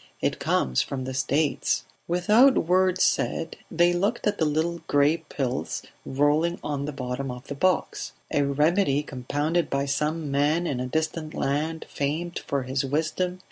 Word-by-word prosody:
It - - -1
comes 65 -1 +1
from 135 -2 -4
the 130 +1 -4
States 140 0 +1
..." - - -41
Without 210 +10 +5
word 185 +1 +3
said 165 - +1
they 175 +1 +3
looked 200 +7 0
at 210 - 0
the 160 - +3
little 160 +3 0
gray 145 +3 +4
pills 135 -5 -3 0.2
rolling 150 +5 +2
about - - -21
on 140 -1 -2
the 150 - -3
bottom 130 0 -4
of 125 +1 -7
the 140 - -5
box... 185 +5 0 0.2
A 145 - +2
remedy 150 +2 +2
compounded 145 +5 -1
by 140 0 0
some 150 +2 -1
man 150 +5 +2
in 135 -7 -1
a 125 - -2
distant 155 +2 -2
land 155 +4 -1
famed 160 +5 -2
for 140 -2 0
his 130 +2 -1
wisdom 160 +6 -1
150 Hz, 170 wpm, -26 LUFS, 140-170 Hz, 0.2 s, Without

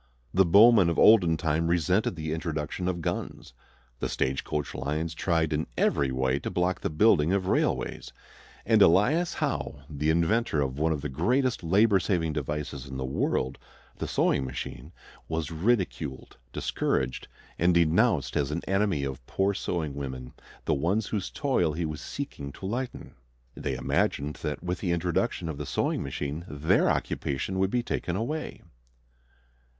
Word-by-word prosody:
The 95 +1 +5
bowmen 100 +1 +7
of 85 - -1
olden 90 -7 +6
time 80 +1 0
resented 90 +4 +1
the 80 -1 -3
introduction 80 +1 -3
of 90 -2 -2
guns; - - -4 0.5
the - - -2
stage 65 0 -1
coach 75 -1 -3
lines 75 +5 -2
tried 80 -2 0
in 75 +1 -1
every 70 -2 +2
way 65 +1 0
to - - -4
block 90 0 0
the - - -1
building 80 -1 +4
of 95 -2 0
railways; - - -1 0.5
and - - +4
Elias 130 - +4
Howe, 70 - -3
the 75 +1 -2
inventor 85 +2 +2
of 70 0 -1
one 80 +1 +2
of 75 -3 -1
the 75 - -3
greatest 120 - 0
labor 100 +4 +4
saving 85 -4 0
devices 75 -2 -4
in 65 0 -6
the 65 - -3
world, 65 0 -1 0.4
the - - -4
sewing 70 - +1
machine, 65 +2 -6 0.4
was 80 -1 -3
ridiculed, 85 - -1 0.2
discouraged, 65 - -1 0.3
and 85 +2 +4
denounced 85 - +3
as 70 -2 +1
an 80 +3 -3
enemy 95 -6 +1
of 65 -2 -5
poor 95 +1 +1
sewing 80 -6 -3
women, 65 -3 -6 0.3
the - - +2
ones 95 +9 0
whose 100 -4 -2
toil 125 - 0
he 85 +2 -2
was 75 0 -5
seeking 70 - -6
to - - -9
lighten. 120 +6 -4 0.4
They 70 -2 -3
imagined 70 +3 0
that 75 +1 -4
with 90 0 -2
the 90 -4 0
introduction 85 0 -1
of 80 -3 -5
the - - -5
sewing - - 0
machine 70 +3 -4
their 75 +1 +2
occupation 75 +7 -2
would 95 0 +2
be 120 +3 0
taken 90 -6 -2
away. 145 +10 -4
80 Hz, 160 wpm, -27 LUFS, 75-95 Hz, 0.5 s, bowmen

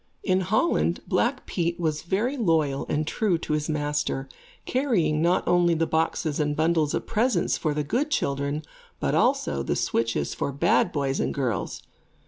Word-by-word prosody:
In 185 -2 +2
Holland, 215 - +1
Black - - 0
Pete 170 0 -2
was 155 -3 -1
very 210 +10 -1
loyal 160 - +1
and 150 +1 0
true 190 +2 +1
to 160 - -3
his 150 +1 -1
master, 145 -2 -1 0.4
carrying 190 - +1
not 175 +2 +2
only 175 -1 +4
the 165 +1 +1
boxes 160 -1 0
and 150 -1 0
bundles 160 -1 +1
of - - -3
presents 235 +3 +1
for 155 -3 -1
the 150 - 0
good 245 - -1
children, 140 - -1 0.4
but - - 0
also 70 -1 +2
the - - -1
switches 115 0 0
for - - -2
bad 140 - +2
boys 140 -2 -1
and - - -1
girls. 130 -5 -2
160 Hz, 165 wpm, -25 LUFS, 145-180 Hz, 0.4 s, only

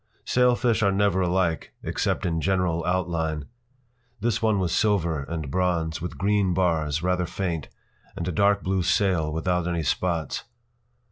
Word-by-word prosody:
p> - - -40
Sailfish 125 -2 +3
are 100 -2 +3
never 95 -1 +2
alike, 90 -2 0
except - - -1
in 80 -2 0
general 90 -3 +1
outline. 85 -4 -1 0.7
This 115 0 0
one 110 -2 +2
was 90 -3 0
silver 85 -9 +1
and 80 -2 -5
bronze, 85 -2 0
with 90 - -5
green 100 -2 +1
bars, 80 -4 +1
rather 90 -1 +1
faint, 85 -6 -3 0.5
and 85 - -4
a - - 0
dark 100 +3 +2
blue 95 0 0
sail 90 -4 +1
without 90 +2 0
any 85 -2 -1
spots. 80 - -1
90 Hz, 150 wpm, -25 LUFS, 80-95 Hz, 0.7 s, Sailfish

